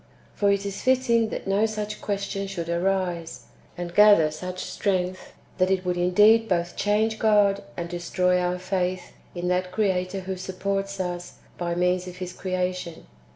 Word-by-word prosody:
For 200 -1 +2
it 200 0 0
is 200 0 -4
fitting 250 -3 +2
that - - -5
no 200 +3 +2
such 215 -1 -5
question 200 -1 -3
should 170 -4 -5
arise, 175 -1 -1 0.3
and 175 -1 -5
gather 205 -6 +6
such 180 +4 -6
strength, 185 -2 -2 0.3
that 185 0 +3
it 190 -1 0
would 180 -1 0
indeed 210 +6 +4
both 175 -1 0
change 215 +2 +1
God, 205 -2 +3 0.2
and 170 - -3
destroy 180 +1 0
our 180 0 0
faith 185 -1 -2 0.2
in 175 0 -3
that 180 0 0
Creator 185 -1 0
who 190 0 -4
supports 195 +1 -3
us 175 -1 -4 0.2
by 170 -1 -2
means 180 +1 +1
of 180 - -8
His 180 -1 -6
creation. 180 -2 -3
185 Hz, 160 wpm, -25 LUFS, 180-200 Hz, 0.3 s, gather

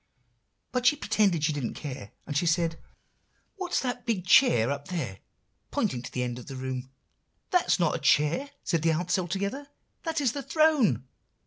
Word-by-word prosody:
But 250 0 +1
she 295 - +6
pretended 205 - +1
she 155 0 +2
didn't 140 -5 -3
care; 130 -8 -7 0.2
and 145 - -5
she 170 +4 +2
said, 165 0 +1 0.8
'What's 370 -2 -1
that 245 -1 -3
big 215 -7 -1
chair 140 - +5
up 140 0 -4
there?' 150 - -4 0.5
pointing 125 - -1
to 120 - -8
the 125 - -1
end 120 0 -3
of 125 - -12
the 135 - -7
long 130 - -6
room. 130 0 -4 0.6
"'That 360 -2 +3
is - - +3
not 170 -3 +2
a - - -2
chair,' 155 - +2
said 165 -4 0
the 165 0 +3
ants 175 +3 0
all 180 - -2
together, 200 - -3 0.3
'that 325 -2 -2
is 270 -5 +2
the 280 - -4
throne. 285 - +3
175 Hz, 195 wpm, -28 LUFS, -, 0.8 s, she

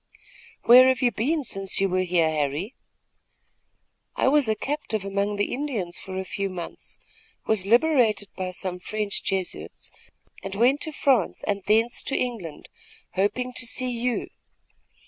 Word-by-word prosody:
"Where 255 +2 +8
have 260 0 +2
you 245 - +4
been 290 +8 0
since 195 -5 -2
you 195 - +3
were 185 0 0
here, 175 -3 +2
Harry?" 155 - -2 1.4
"I - - +2
was 285 -4 +3
a 220 - +2
captive 220 -5 -3
among 200 +1 -1
the 205 0 -1
Indians 235 -11 -3
for 190 0 -7
a 190 - -3
few 195 +1 -3
months, 175 -2 -8 0.5
was 205 -3 +2
liberated 235 -5 +3
by 185 -1 -3
some 180 0 -3
French 210 +2 -2
Jesuits 190 -2 -3 0.5
and 195 0 -6
went 250 +7 +3
to 315 - -3
France 265 - +1
and 200 -1 -1
thence 225 +3 +2
to 275 - -2
England, 220 -11 -4 0.4
hoping 250 +6 -1
to 250 -1 -1
see 255 +2 -1
you. 240 0 -2
210 Hz, 150 wpm, -25 LUFS, 190-250 Hz, 1.4 s, Where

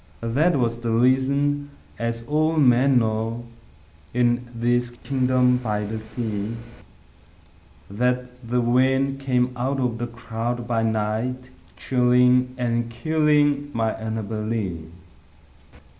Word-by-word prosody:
that 160 +4 +3
was 115 -2 0
the 120 -1 -3
reason 140 +4 +2 0.3
(as 115 0 -3
all 155 +5 +1
men 130 -1 +4
know, 115 +1 -1 0.7
In 120 0 +1
this 120 +1 0
kingdom 125 0 +1
by 105 -4 -2
the 110 +2 -4
sea) 110 -1 -4 1.3
That 125 +4 0 0.2
the 120 0 -1
wind 130 +3 +2
came 125 -2 +1
out 130 +3 -1
of 120 -3 -1
the 120 - -2
cloud 115 +1 -4
by 115 -1 0
night, 115 +4 -2 0.3
Chilling 125 0 +3
and 120 -1 -1
killing 145 +1 +1
my 110 -1 0
Annabel 110 -1 -4
Lee. 100 -8 -3
120 Hz, 115 wpm, -23 LUFS, 115-130 Hz, 1.3 s, men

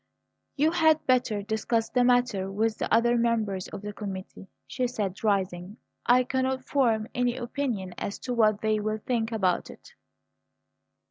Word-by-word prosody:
"You 300 +3 +3
had 315 -2 +3
better 245 -5 +1
discuss 220 +2 -1
the 250 -1 +3
matter 245 -6 +2
with 220 +2 0
the - - -2
other 235 +1 +4
members 220 -5 0
of 195 - -8
the 210 0 -5
committee," 195 -2 -7 0.2
she 255 -1 -2
said, 205 -6 -4
rising. 190 -1 -1 0.3
"I 250 +1 +5
cannot 260 +1 -1
form 230 -6 +1
any 245 0 0
opinion 240 -7 -3
as 200 - -4
to 250 - -2
what 215 -3 +3
they 215 -1 +1
will 215 +1 -1
think 235 -2 -1
about 190 -5 0
it." 485 - -14
225 Hz, 155 wpm, -27 LUFS, 205-250 Hz, 0.3 s, I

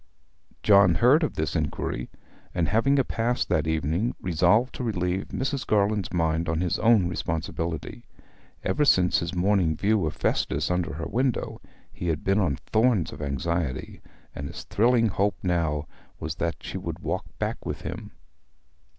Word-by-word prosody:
John 100 -4 +6
heard 130 - +5
of 155 - -1
this 80 +1 -2
inquiry, 75 -5 -2 0.5
and, 85 -2 +1
having 135 +6 +3
a 135 - +4
pass 120 +1 -1
that 80 0 0
evening, 80 +8 0
resolved 90 +8 +2
to - - -5
relieve 95 -4 -1
Mrs. 135 0 -2
Garland's 105 -1 +1
mind 80 -1 0
on 80 0 0
his 90 -1 0
own 110 -5 +4
responsibility. 80 -5 -4 0.6
Ever 150 - +1
since 90 -10 +4
his 85 0 -4
morning 90 -3 +2
view 105 -4 +2
of 75 - -4
Festus 70 +5 0
under 90 -5 -1
her 80 - -5
window 130 0 -1 0.3
he 90 - -5
had 80 -2 -1
been 95 +2 +2
on 80 -9 +1
thorns 110 - +1
of - - -9
anxiety, 70 0 -2 0.3
and 70 - -5
his - - -8
thrilling 115 +2 +3
hope 100 +2 0
now 80 -5 0 0.3
was 80 0 -3
that 85 0 -3
she - - -5
would - - -5
walk - - -3
back - - -3
with - - -5
him. - - -6
90 Hz, 160 wpm, -26 LUFS, 80-110 Hz, 0.6 s, John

